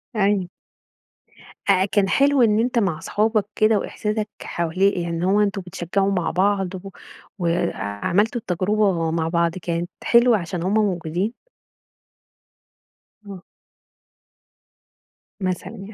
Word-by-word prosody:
أيوه. 200 -3 +1 1.2
آآ، 190 -1 +4
كان 200 -1 +1
حلو 280 -1 +3
إن 215 -2 +4
أنت 240 0 +1
مع 175 -7 0
صحابك 215 +3 0
كده 215 0 +3
وإحساسك 215 +1 -3
حوالي 170 +4 +1
يعني 175 -3 -3
إن 170 - -3
هو 195 +3 +3
أنتم 200 -1 0
بتشجعوا 180 +2 -1
مع 180 -3 0
بعض 190 0 +1
و 195 +1 -8 0.5
وعملتوا 175 - 0
التجربة 185 -2 0
مع 165 -1 -1
بعض 170 0 +1
كانت 170 +1 -2
حلوة 235 -1 +5
عشان 175 -1 -4
همّ 190 +3 0
موجودين؟ 190 0 0 1.9
آه. 190 -2 -9 2.0
مثلًا 185 +1 -2
يعني، 210 -1 -10
195 Hz, 115 wpm, -22 LUFS, 175-210 Hz, 2.0 s, حلوة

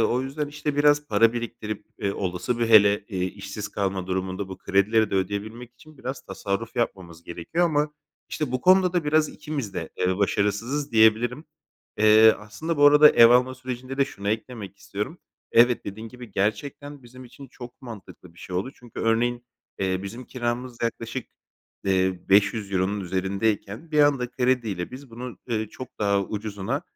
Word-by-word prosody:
o 120 +3 +2
yüzden 145 +3 -3
işte 150 -1 -4
biraz 145 0 +4
para 115 0 +4
biriktirip, 115 -3 -5
eee, 100 -1 -1
olası, 95 +6 -2
bir 115 -1 +1
hele 105 -2 +6
işsiz 100 +2 -4
kalma 95 -2 -2
durumunda, 95 +1 -3
bu 95 - -8
kredileri 105 +2 +2
de - - -2
ödeyebilmek 105 +5 -3
için 150 +4 -18
biraz 130 +1 -5
tasarruf 100 +4 -4
yapmamız 90 -8 -3
gerekiyor 85 - -2
ama 150 -2 +1 0.4
işte, 145 -5 -3
bu 130 - -1
konuda 185 +1 +5
da 175 -4 0
biraz 155 +1 +3
ikimiz 150 -9 -5
de, - - -4
eee, 90 0 +1
başarısızız 105 +8 0
diyebilirim. 115 +5 +3 0.5
Eee, 110 +1 +7
aslında, 110 +11 -5
bu 145 0 +6
arada 150 +1 +8
ev 115 0 +7
alma 125 +1 +4
sürecinde 130 +1 -6
de 140 - +5
şunu 100 -7 -6
eklemek 110 -2 -4
istiyorum. 105 - -5 0.3
Evet, 120 +1 +5
dediğin 110 +3 -7
gibi, 125 -3 -11
gerçekten 140 +8 -3
bizim 125 +2 -13
için 135 +2 -13
çok 120 +1 -12
mantıklı 105 -7 -11
bir - - -19
şey 90 +1 -6
oldu. 125 +9 -2
Çünkü, 120 -2 -10
örneğin, 120 +2 0 0.3
eee, 95 0 -1
bizim 115 +6 -7
kiramız 120 0 -4
yaklaşık, 115 +1 -3 0.6
eee, 95 -1 +1
€500 100 -1 +2
üzerindeyken, 100 - -2
bir 150 - +3
anda 140 -4 +3
krediyle, 120 -8 -1
biz 130 0 -11
bunu, 120 +1 -8
eee, 110 -2 -1
çok 130 +3 -9
daha 100 -1 +2
ucuzuna, 105 -2 -4
115 Hz, 160 wpm, -25 LUFS, 100-130 Hz, 0.6 s, arada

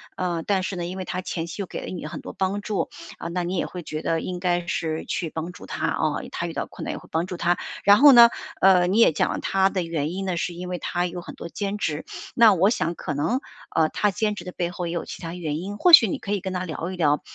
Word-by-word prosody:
呃， 175 -3 -2
但 195 -2 +1
是 185 0 -3
呢， 175 - -3
因 180 +2 -5
为 190 - -3
她 185 - -4
前 165 -2 -4
期 170 +4 -6
又 - - -3
给 - - -6
了 - - -7
你 180 -4 -6
很 - - -7
多 - - -7
帮 195 +2 -1
助， 205 -1 -2 0.3
啊， - - -6
那 175 +1 -2
你 180 +2 -2
也 - - 0
会 180 -1 -7
觉 155 0 -5
得 165 -1 0
应 180 -1 -4
该 175 -1 0
是 160 -2 -2
去 170 - -3
帮 160 +3 -5
助 180 - -12
她， - - -2
哦， - - -1
她 - - -3
遇 - - -6
到 - - -2
困 - - -9
难 - - -3
也 - - -5
会 - - -14
帮 165 +2 0
助 185 - -5
她。 175 +1 +1 0.3
然 205 +1 +7
后 285 +2 +9
呢， 235 -1 +10 0.3
呃， 185 -2 +6
你 195 - +1
也 230 - +6
讲 155 - +1
了 - - -3
她 190 0 +2
的 190 -2 -1
原 160 -2 -2
因 195 +1 -3
呢， 185 -3 -2
是 175 - -2
因 180 +1 -7
为 180 - -2
她 175 0 -1
有 175 0 -4
很 175 - -9
多 170 - -8
兼 200 +2 -3
职。 155 -6 -2 0.3
那 230 -3 +7
我 190 +2 +4
想 170 -7 -1
可 155 - -4
能， 190 - 0 0.3
呃， 160 -1 +3
她 210 - +1
兼 210 +2 -1
职 180 - -8
的 180 - -7
背 175 -1 -2
后 175 -1 -4
也 170 - -3
有 170 - -2
其 - - -9
它 165 -1 -5
原 160 -4 -3
因， 195 +4 -5
或 355 +12 +4
许 240 -9 +10
你 - - -2
可 200 - -6
以 205 - +1
跟 190 0 -5
她 180 0 -2
聊 170 +1 -4
一 - - -5
聊， 150 -4 +2
180 Hz, 320 characters per minute, -24 LUFS, 170-195 Hz, 0.3 s, 呢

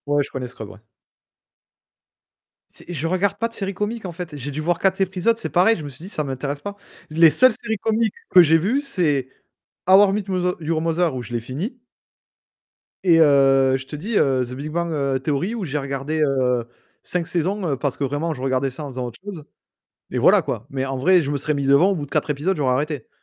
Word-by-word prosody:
Ouais, 145 0 +2
je - - -10
connais 130 -2 -4
Scrubs, 110 -4 -9
ouais. 100 - -14 1.9
C'est - - -14
je 160 -2 -3
regarde 190 +3 0
pas 230 - 0
de - - -13
séries 195 -3 -3
comiques 210 +3 -3
en 180 - -5
fait, 170 -3 -7
j'ai 140 +1 -5
dû 150 +3 -4
voir 170 +1 0
4 190 0 +1
épisodes. 190 +4 +1
C'est - - -4
pareil, 190 +6 +4
je 160 - -7
me 145 - -6
suis 135 +4 -12
dit: - - -8
«Ça 155 - -2
m'intéresse 140 +1 -4
pas». 205 +3 -6 0.3
Les 160 +1 +6
seules 255 - +5
séries 225 -2 -2
comiques 220 +1 0 0.2
que 180 - +8
j'ai 165 -1 +5
vu, 220 - 0
c'est 165 - 0 0.6
How 195 +1 +7
I - - 0
Met 210 0 -1
Mother 180 -1 0
Your 160 0 -1
Mother, 165 -2 0
où 125 - -3
je 120 +1 -9
l'ai 120 - -1
fini 170 - -5 1.2
et 170 -3 +5
heu, 135 -3 +5
je 135 - -9
te 150 - -7
dis, 205 +10 -4
heu, 130 -2 +2
The 120 - -10
Big 140 +4 -6
Bang, 170 +1 -2
heu, 140 -3 0
Theory 160 - -1
où 215 -5 -3
j'ai 150 -1 -2
regardé, 140 +3 -3
heu, 130 -4 +1 0.4
5 175 -2 -2
saisons, 185 +4 -1
heu, - - +1
parce 140 -1 -2
que - - -3
vraiment 145 +5 -1
je 130 - -9
regardais 135 0 0
ça 130 +4 -8
en 145 - -6
faisant 130 -1 -4
autre 120 - -11
chose 195 -7 -7 0.7
et - - -1
voilà - - +6
quoi, 105 - -4
mais 135 0 -2
en 135 0 -3
vrai 180 +8 +4
je 145 -2 -2
me - - 0
serais 145 +2 -1
mis 140 -1 -2
devant 140 +8 +5
au 195 - 0
bout 150 - -4
de - - -23
4 - - -1
épisodes, 150 +7 0
j'aurais 130 -4 +1
arrêté 145 -2 -3
155 Hz, 240 wpm, -22 LUFS, 135-185 Hz, 1.9 s, que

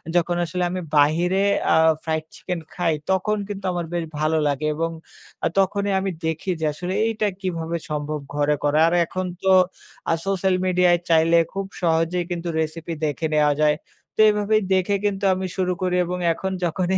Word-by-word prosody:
যখন 175 0 +2
আসলে 180 +2 -2
আমি 185 0 -3 0.2
বাহিরে 175 +6 +3 0.3
আ - - +5 0.3
fried 160 -1 -2
chicken 170 +4 -4
খাই। 170 -3 0 0.2
তখন 210 +3 +1
কিন্তু 200 -2 -6
আমার 175 -1 -2
বেশ 170 -1 -1 0.2
ভালো 155 +1 +1
লাগে 145 +1 -1
এবং 165 +1 -1 0.5
আ - - +4
তখনই 200 +1 +1
আমি 190 0 -2
দেখি 160 +4 -2
যে, - - +1
আসলে 180 +4 -4
এইটা 220 -2 0
কিভাবে 170 -2 -2
সম্ভব 150 0 -3 0.2
ঘরে 145 0 +2
করা। 145 +1 +2
আর 170 - +1
এখন 185 +2 -4 0.2
তো 190 - +4 0.6
আ - - +4
social 190 -1 +1
media 180 0 +3
এ - - 0
চাইলে 165 +1 +4 0.2
খুব 195 0 -3 0.2
সহজেই 165 +1 +1
কিন্তু 175 0 -3
recipe 160 +1 -3
দেখে 150 +2 -2
নেওয়া 150 -1 +4
যায়। 150 0 +4 0.4
তো - - -16
এভাবেই 210 +1 +2
দেখে 190 +2 +2
কিন্তু 200 -1 -1
আমি 185 0 -3
শুরু 185 -1 +1
করি 180 -1 0
এবং 180 +1 -3 0.2
এখন 190 +3 -4
যখনই 185 +3 0
175 Hz, 180 wpm, -23 LUFS, 160-190 Hz, 0.6 s, আ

